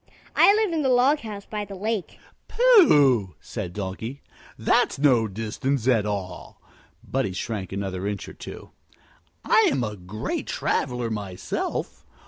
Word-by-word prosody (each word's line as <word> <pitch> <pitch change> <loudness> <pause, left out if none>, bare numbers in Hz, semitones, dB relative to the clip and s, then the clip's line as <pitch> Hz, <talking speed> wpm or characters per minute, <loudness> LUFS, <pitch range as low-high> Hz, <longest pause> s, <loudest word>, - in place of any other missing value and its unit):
"I - - +7
live 430 -5 +1
in 320 - 0
the 270 - +1
log 255 +4 +4
house 210 -4 -8
by 210 -1 -4
the 200 -1 -8
lake." 210 0 -3 0.3
"Pooh!" 145 - +5
said 95 -6 -6
the 105 - -3
Donkey. 110 +8 -6 0.3
"That's - - +2
no 130 -6 +3
distance 115 +5 -2
at 115 -5 +3
all." 95 -3 -5 0.5
Buddie 130 -8 -1
shrank 95 -1 -4
another 95 -1 -3
inch 100 -2 -4
or - - -9
two. - - -10 0.7
"I'm 135 -2 +3
a 105 -2 -3
great 95 +4 -5
traveler 125 -2 -1
myself. 100 -4 -4
120 Hz, 140 wpm, -24 LUFS, -, 0.7 s, I